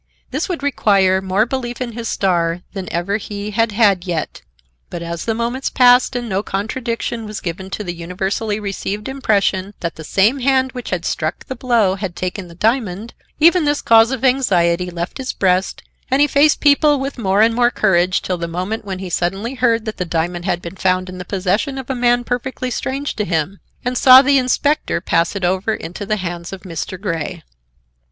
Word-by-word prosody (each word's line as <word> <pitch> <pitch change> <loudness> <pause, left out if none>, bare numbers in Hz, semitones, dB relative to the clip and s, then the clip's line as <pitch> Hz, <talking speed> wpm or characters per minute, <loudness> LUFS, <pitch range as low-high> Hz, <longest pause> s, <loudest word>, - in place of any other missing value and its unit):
This - - -2
would 340 -6 -3
require 195 -9 +3
more 190 +3 +1
belief 245 -1 -4
in 250 -2 -3
his 230 0 -5
star 175 -3 0
than 190 -3 -6
ever 180 +4 -1
he 205 0 -6
had 225 +1 +1
had 200 -4 +3
yet. 170 -3 -3 0.5
But 170 - -6
as 170 -1 -5
the 225 - 0
moments 240 +3 -2
passed, 250 0 +5
and 240 -1 -3
no 195 -2 -1
contradiction 230 +2 -3
was 210 0 -5
given 185 +2 -5
to 210 - -4
the 175 -3 -4
universally 190 +5 -3
received 205 0 -4
impression 205 -7 0
that 170 -1 -4
the 160 - -8
same 210 - +2
hand 260 0 +2
which 250 -2 -7
had 175 -3 -2
struck 155 -1 -2
the 260 - -5
blow 235 -6 +2
had 190 -2 -5
taken 185 0 -4
the 170 - -13
diamond, 220 0 -1 0.3
even 340 +2 +5
this 290 0 0
cause 225 0 +6
of 265 0 -2
anxiety 180 -9 +2
left 175 +7 -5
his 260 -1 -3
breast 185 0 0 0.3
and 265 +1 +2
he 290 - +6
faced 295 +1 +3
people 290 0 +4
with 270 -1 -4
more 200 -1 +3
and 225 +1 +3
more 240 +1 +3
courage 185 -5 +2
till 180 -2 -2
the 170 - -3
moment 185 +7 -3
when 195 -2 -5
he 190 0 -6
suddenly 195 +8 -1
heard 235 -3 +1
that 215 - -5
the 180 - -1
diamond 175 +1 -2
had 175 -2 -1
been 170 +2 -7
found 185 0 +1
in 185 0 -8
the 180 - -6
possession 200 - -1
of 265 0 -5
a - - 0
man 245 -1 +2
perfectly 250 +1 -3
strange 275 +4 -3
to 210 - -1
him, 170 +1 -2 0.3
and 250 0 0
saw 260 0 +9
the 280 0 +4
inspector 285 +4 +1
pass 170 +1 0
it 195 -2 -1
over 190 +5 0
into 180 +4 -7
the 215 - 0
hands 175 -2 -5
of 195 -1 -8
Mr. 180 +1 -6
Grey. 170 -3 -4
205 Hz, 205 wpm, -18 LUFS, 180-245 Hz, 0.5 s, saw